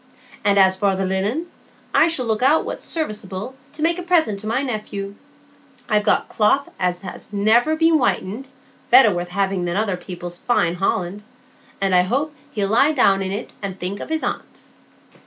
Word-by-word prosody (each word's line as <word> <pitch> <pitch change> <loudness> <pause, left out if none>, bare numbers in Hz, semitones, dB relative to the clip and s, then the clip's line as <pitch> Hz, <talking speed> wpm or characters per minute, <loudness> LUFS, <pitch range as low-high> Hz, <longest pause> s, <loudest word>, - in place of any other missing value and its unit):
And 200 -1 +3
as 190 -1 +5
for 195 0 +1
the 190 0 -1
linen, 200 - -1 0.5
I 320 - +5
shall 325 -7 -1
look 220 -1 0
out 285 +5 +3
what's - - -6
serviceable, 215 - -4 0.2
to 305 - -6
make 335 +2 +1
a - - -3
present 340 - +2
of - - -8
to 215 - -7
my 235 +5 0
nephey; 210 -5 -4 0.7
I've 210 -2 +2
got 210 - +1
cloth 225 +6 +1
as 180 -1 -1
has 195 - -9
never 220 +9 +3
been 325 0 +4
whitened, 245 -2 -1 0.4
better 245 -4 +7
worth 175 0 -3
having 190 -1 -1
than 175 +1 -2
other 205 -3 0
people's 175 -1 -8
fine 175 -8 +1
holland; 185 +1 -1 0.6
and 195 -1 +1
I 180 - +6
hope 275 +11 -1 0.2
he'll 200 -2 -1
lie 275 +8 +4
down 200 -8 +3
in 190 0 -2
it 205 +4 -5
and 195 -2 -5
think 190 +3 -3
of - - -7
his 320 0 -1
aunt." - - -5
205 Hz, 190 wpm, -21 LUFS, 190-260 Hz, 0.7 s, better